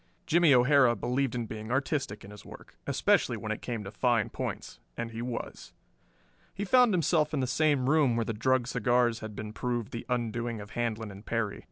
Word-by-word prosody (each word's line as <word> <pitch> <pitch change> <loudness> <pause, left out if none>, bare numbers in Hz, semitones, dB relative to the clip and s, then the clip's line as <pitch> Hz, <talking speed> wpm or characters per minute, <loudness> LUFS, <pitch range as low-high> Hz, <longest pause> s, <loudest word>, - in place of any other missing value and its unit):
Jimmie 170 -1 +4
O'Hara 125 -1 +5
believed 125 +3 -1
in 120 -2 -2
being 110 0 -7
artistic 135 -5 -1
in 100 - -11
his 105 0 -12
work, - - -13
especially - - +2
when - - -5
it - - -4
came 115 -3 -4
to 95 - -7
fine 115 0 +1
points, - - -5 0.2
and 115 0 -4
he 115 0 -6
was. 120 -1 -6 0.8
He 200 - -3
found 250 +2 +5
himself 160 -4 +2
in - - 0
the 130 - +1
same 140 0 +1
room 145 -5 +3
where 115 -1 0
the 115 - -2
drugged 130 +2 +1
cigars 120 -1 +2
had 110 -2 -8
been 105 +1 -6
proved 120 -1 -3
the 115 - -6
undoing 120 -1 -2
of 105 +1 -10
Handlon 110 -2 -3
and 100 +1 -11
Perry. 110 -3 -2
120 Hz, 200 wpm, -29 LUFS, 110-135 Hz, 0.8 s, O'Hara